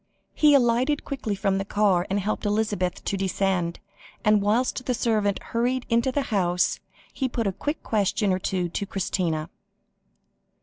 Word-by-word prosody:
He 300 -2 +5
alighted 255 +3 +2
quickly 245 -7 -3
from 195 -1 0
the - - -1
car, 195 -3 +2
and 195 +1 +1
helped 205 +2 -2
Elizabeth 205 -4 -1
to - - -1
descend; 190 -2 -1 0.5
and, 210 -1 +5
whilst 240 +5 0
the 250 - +1
servant 215 -4 +1 0.2
hurried 245 +2 0
into 235 +3 +2
the 280 +2 0
house, 180 -2 +1 0.3
he 265 -2 -1
put 235 -2 -2
a 195 - +1
quick 295 - -4
question 205 -2 +1
or 185 - 0
two 185 -1 -1
to 200 +4 -3
Christina. 170 -5 -1
205 Hz, 160 wpm, -25 LUFS, 190-240 Hz, 0.5 s, He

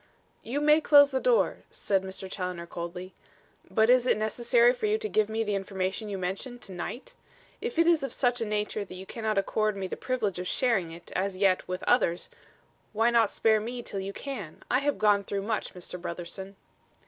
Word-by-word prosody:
"You 270 +6 -3
may 300 +1 +5
close 285 -1 +7
the 265 - +1
door," - - +2
said 195 -2 0
Mr. 190 0 -6
Challoner 180 -2 -4
coldly. 175 +2 -7 0.6
"But 220 0 +3
is 250 0 +4
it - - +3
necessary 235 +2 +3
for 425 - -2
you 425 +1 +2
to 440 - -3
give 215 - +1
me 220 +1 -1
the 210 -1 -2
information 195 +2 -2
you 200 - -3
mention, 190 +7 -4
to 215 - -12
night? 240 - -6 0.5
If 470 -6 -4
it 335 - +5
is 335 -3 +4
of 275 - -3
such 245 -2 +1
a - - 0
nature 210 0 -1
that 185 - -10
you 185 +1 -8
cannot 220 0 -3
accord 215 +2 +1
me 195 - -3
the 185 - -4
privilege 215 -8 -2
of 180 - -4
sharing 225 -10 +1
it, 170 +1 -12
as 190 0 -1
yet, 190 -1 +2
with 185 0 -4
others, 180 -8 +1 0.6
why 225 +2 +3
not 230 -3 +4
spare 220 -1 +3
me 240 +3 -5
till 200 - -4
you 195 +1 -4
can? 205 - -7
I - - +4
have 285 0 0
gone 205 -1 +3
through 200 0 -3
much, 215 -2 -3
Mr. 180 0 -6
Brotherson." 180 +3 -6
210 Hz, 205 wpm, -28 LUFS, 190-245 Hz, 0.6 s, close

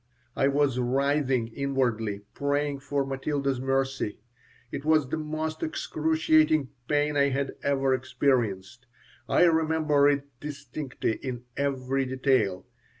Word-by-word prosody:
I 135 - +3
was 140 -2 +2
writhing 135 -1 +1
inwardly, 115 -6 -1
praying 145 0 -1
for 140 0 -1
Matilda's 135 -1 -2
mercy. 135 -4 -1 0.5
It 140 - -5
was 155 -2 +3
the 160 - -1
most 155 +1 -3
excruciating 155 -2 +2 0.2
pain 145 0 +1
I 140 0 +4
had 140 +1 -2
ever 135 -1 +1
experienced. 120 -4 -1 0.4
I - - +4
remember 160 -3 +3
it 140 -1 +1 0.2
distinctly 140 -4 -4
in 125 -3 -5
every 135 -1 -1
detail. 130 -8 +1
140 Hz, 115 wpm, -27 LUFS, 130-150 Hz, 0.5 s, I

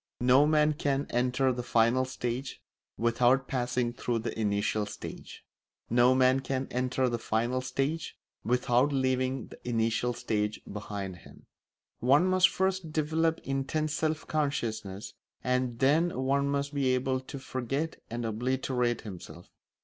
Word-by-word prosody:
No 130 +4 +5
man 155 0 +4
can 140 -1 0
enter 125 +2 +2
the 125 - -3
final 120 +2 +3
stage 130 0 -4 0.4
without 120 +3 +3
passing 125 -2 -1
through 120 -1 -2
the 115 0 -4
initial 105 0 0
stage; - - -9 0.5
no 120 +2 +5
man 130 0 +4
can 135 0 -2
enter 130 +1 0
the 120 -1 -1
final 120 +4 0
stage 135 +5 -2 0.3
without 125 +3 +2
leaving 130 -2 0
the - - -12
initial 115 +1 0
stage 105 -2 -2
behind 100 -3 -6
him. - - -16 0.5
One 140 +8 +4
must 185 0 +5
first 190 -3 -1
develop 160 +1 +1
intense 145 +3 -1
self 155 0 -1
consciousness, 115 -10 -2 0.3
and 125 -1 0
then 155 +7 +2
one 140 +1 +1
must 140 0 -1
be 135 -3 +2
able 130 +1 0
to 130 +2 -8
forget 135 +4 -3
and 120 0 -3
obliterate 125 +1 0
himself. 90 -4 -10
130 Hz, 135 wpm, -29 LUFS, 120-140 Hz, 0.5 s, No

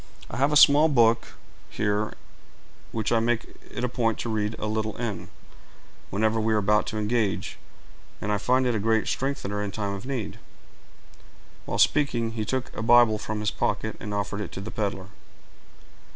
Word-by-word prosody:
I - - -5
have 140 +3 +2
a - - +1
small 145 +2 +7
book 115 -4 +3 0.4
here, 105 0 -1 0.8
which 110 -2 -2
I 115 - +4
make 120 +1 0 0.2
it 120 - -5
a - - +2
point 115 -2 0
to 120 - -4
read 105 0 -1
a - - -4
little 110 0 -2
in, 115 -4 -4 0.8
whenever 110 +2 +1
we 110 0 +1
are - - +3
about 105 +1 +2
to 110 - -4
engage, 105 -1 -1 0.6
and 105 - -2
I 105 - +1
find 130 +5 +2
it 125 - +2
a 110 - 0
great 110 +1 +1
strengthener 115 -7 -2
in 105 - -2
time 100 0 -3
of 100 +6 -7
need." 125 -7 -4 1.3
While - - -2
speaking, 120 -6 +2
he 110 -2 -3
took 130 +3 -3
a - - -4
Bible 115 -2 +5
from 105 0 -4
his 105 - 0
pocket, - - -1
and 105 - -6
offered 100 0 -2
it - - -5
to - - -5
the 100 +3 -6
peddler. 100 -2 -3
110 Hz, 180 wpm, -26 LUFS, 105-120 Hz, 1.3 s, small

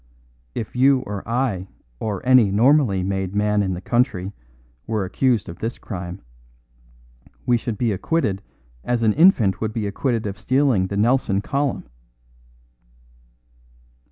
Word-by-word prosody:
If 110 - -5
you 130 +1 +4
or 105 -6 -5
I 115 -7 -1 0.3
or 105 -2 -4
any 125 -5 +6
normally 115 -2 +3
made 95 0 -2
man 105 0 +2
in 95 -2 -1
the 90 - -7
country 105 -5 0 0.6
were 110 -4 -1
accused 115 +2 +1
of 85 - -9
this 115 +2 -3
crime, 90 -1 -7 1.2
we 120 - +3
should 115 -2 -3
be 120 0 0
acquitted 100 - -1 0.4
as 120 -1 -1
an 110 -1 +4
infant 130 - +4
would 110 -1 -2
be 110 -3 -2
acquitted 115 +3 -1
of 100 -1 -5
stealing 130 -8 +2
the 100 - -4
Nelson 110 -2 +2
column." 140 - -2
110 Hz, 135 wpm, -22 LUFS, 100-125 Hz, 1.2 s, any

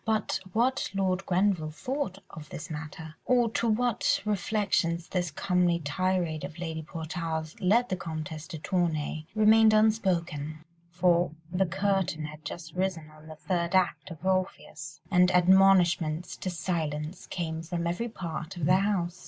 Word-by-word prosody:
But 220 -4 0
what 245 +4 +1
Lord 190 -1 0
Grenville 180 -4 +2
thought 200 - -3
of 150 -3 -10
this 155 - -7
matter, 155 +1 -7
or 240 -3 +3
to 230 - 0
what 240 +1 +2
reflections 195 -5 0
this 175 -4 -1
homely 180 -2 +2
tirade 170 0 -1
of 160 - -7
Lady 165 -2 -4
Portarles 160 0 -4
led 230 +7 +3
the 185 - -1
Comtesse 160 -2 -6
de 165 - -6
Tournay, 155 -2 -1
remained 215 0 +6
unspoken, 170 -8 +1 0.2
for 175 0 +2 0.2
the 185 +1 +1
curtain 190 -3 0
had 150 0 -9
just 165 0 -7
risen 180 -4 -2
on 155 0 -16
the 155 - -9
third 170 +2 -1
act 185 0 +1
of 165 0 -10
Orpheus, 170 -6 -2
and 180 -1 +5
admonishments 180 -3 +4
to 185 - -3
silence 165 -2 -3
came 160 -2 -3
from 170 +1 -3
every 175 +8 -2
part 170 -2 -6
of 165 - -1
the 185 +4 +5
house. 185 -3 0
175 Hz, 150 wpm, -28 LUFS, 160-190 Hz, 0.2 s, remained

